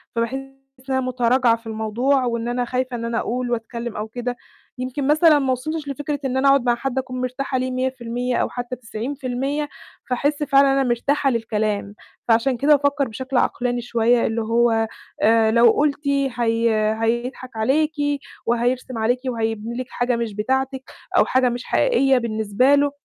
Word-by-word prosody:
فباحس 230 +2 -1 0.6
إن - - 0
أنا 260 - +1
مُتراجعة 250 -1 +2
في 230 0 -13
الموضوع 235 +5 0
وإن 235 -1 -2
أنا 245 0 -1
خايفة 255 0 -2
إن 230 0 -4
أنا 230 0 -1
أقول 245 +1 -2
وأتكلِّم 235 0 -4
أو 215 +1 -3
كده. 245 +2 -4 0.4
يمكن 260 +2 -3
مثلًا 310 0 +5
ما 265 -1 0
وصلتش 295 +4 -3
لفكرة 290 +1 -3
إن 260 0 -1
أنا 275 +1 +3
أقعد 275 -2 +5
مع 240 -1 +3
حد 265 +1 -4
أكون 255 -1 -3
مرتاحة 260 +1 -2
ليه 255 0 -1
100% 250 -1 -2
أو - - 0
حتّى 245 0 -5
90%، 260 +5 -3 0.4
فاحس 285 +4 0
فعلًا 275 -1 +4
أنا 270 0 +2
مرتاحة 270 +3 +1
للكلام. 215 -3 -2 0.3
فعشان 235 +2 +3
كده 295 +4 +5
بافكّر 285 -1 +1
بشكل 260 +4 -4
عقلاني 245 -1 0
شوية 235 0 +2
اللي 225 0 -1
هو 225 0 +2 0.3
آآ، 220 0 +4
لو 235 0 +6
قُلتِ 290 +1 0
هي 230 -5 +1
هيضحك 240 +3 -2
عليكِ 300 +8 +1 0.5
وهيرسم 245 +1 0
عليكِ 240 +3 +1
وهيبني 225 -1 -2
لِك 255 0 -4
حاجة 245 0 0
مش 230 -3 -3
بتاعتِك 265 +4 -1 0.3
أو - - +6
حاجة 255 -1 +2
مش 240 +1 -4
حقيقية 275 - +3
بالنسبة 230 +3 +2
له، 285 0 +2
245 Hz, 165 wpm, -22 LUFS, 230-270 Hz, 0.6 s, لو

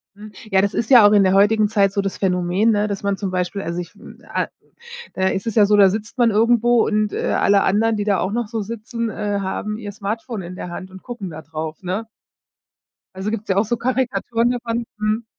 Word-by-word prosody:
Mhm. 210 +1 -11 0.2
Ja, 190 0 +4
das 200 +1 0
ist 225 - -2
ja 240 -6 +8
auch 205 - +3
in 205 -2 +5
der 185 - +3
heutigen 210 +2 +4
Zeit 200 -2 +2
so 200 - +1
das 195 -1 -4
Phänomen, 185 +3 +1
ne, 210 0 +1
dass 200 -1 -4
man 200 0 0
zum 195 -2 -3
Beispiel 185 +2 -2
also 170 0 -4
ich, 175 - -7
hm, - - -14
ah - - -1 0.7
äh, 190 0 +1
es 190 - -4
ist 225 - -3
ja 210 -2 +6
so, 210 +1 +4
da 195 -2 +6
sitzt 215 +4 -5
man 240 -2 +4
irgendwo 235 +2 +3
und, 210 -1 0
äh, - - -3
alle 200 -1 +3
anderen, 220 +3 +2
die 205 - -2
da 200 -2 +1
auch 190 +3 -1
noch 235 -1 -2
so 220 -1 -3
sitzen, 230 +1 -4
äh, 205 -1 -2
haben 205 +2 -3
ihr 205 -3 -7
Smartphone 215 +1 -4
in 175 +1 -8
der 180 - -6
Hand 185 +2 -7
und 190 0 -12
gucken 235 -7 -7
da 160 0 -9
drauf, 155 +1 -6
ne? 190 +5 -3 1.1
Also, 190 +2 -3
gibt's 215 -1 -5
ja 190 - +1
auch 200 - +3
so 240 +3 -1
Karikaturen 245 -1 0
davon, 235 -1 -3
mhm. 215 +2 -1
205 Hz, 240 wpm, -20 LUFS, 190-225 Hz, 1.1 s, ja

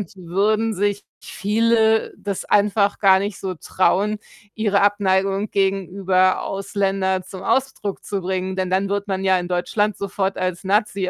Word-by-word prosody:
würden 210 +5 0
sich 205 +1 -1 0.2
viele 220 +1 +1
das 200 -2 -4
einfach 205 0 +2
gar 190 -2 +5
nicht 200 0 -3
so 190 -1 -4
trauen, 200 +5 +1 0.4
ihre 205 -3 +1
Abneigung 195 0 +1
gegenüber 190 -1 +1
Ausländer 195 -1 -1
zum 185 +1 -10
Ausdruck 265 -5 -1
zu 200 -2 -3
bringen, 185 +1 -2
denn 185 -1 -2
dann 190 +2 +1
wird 200 +1 -2
man 190 0 -2
ja 190 -1 +3
in 175 - -5
Deutschland 205 +4 0
sofort 195 0 -2
als 185 0 -2
Nazi 195 -1 0
195 Hz, 145 wpm, -21 LUFS, 190-205 Hz, 0.4 s, gar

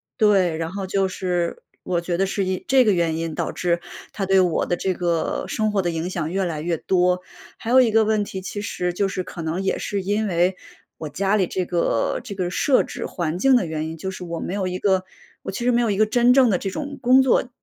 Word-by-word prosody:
对， 195 -7 +3
然 165 +1 -3
后 195 -1 -4
就 195 0 +1
是， 180 -2 -2 0.2
我 175 -2 0
觉 170 0 -2
得 195 - +2
是 195 0 -1
因 185 0 -2
这 260 -2 +5
个 210 - +4
原 165 -3 0
因 165 -1 -3
导 - - -2
致 175 -1 -1 0.3
它 195 - -2
对 190 0 +4
我 180 -3 +2
的 175 - -1
这 190 +1 -1
个 170 -2 -1
生 215 -1 0
活 195 - +2
的 175 - -1
影 165 +2 -3
响 160 -3 -3
越 190 0 0
来 155 -3 -3
越 165 +1 -1
多。 180 +1 +1 0.4
还 225 - -6
有 255 +2 +7
一 235 - +3
个 220 0 +4
问 215 -1 +1
题， 195 -1 -6
其 205 +2 -5
实 180 -3 -2
就 195 +2 0
是 190 -1 -3
可 175 - -8
能 165 +3 -2
也 195 - 0
是 200 -1 -3
因 205 +3 0
为 180 0 +1 0.4
我 155 - -6
家 195 +7 0
里 190 -3 +2
这 185 +1 -2
个 170 -10 0
这 - - -7
个 180 -2 -2
设 260 +8 +3
置 245 - -6
环 170 -2 -3
境 265 +8 +4
的 205 - 0
原 160 -1 -3
因， 160 - -7
就 190 - -4
是 185 -1 -7
我 170 -1 -5
没 - - -4
有 200 -1 -1
一 185 0 -3
个 190 -2 +2 0.4
我 - - -5
其 235 +5 -4
实 250 - +3
没 240 - +3
有 230 - +1
一 195 - -1
个 215 - +4
真 240 +3 +3
正 255 -2 +5
的 190 - +2
这 195 - -3
种 285 +7 -5
工 255 +2 +6
作 260 -1 +2
190 Hz, 280 characters per minute, -22 LUFS, 175-210 Hz, 0.4 s, 有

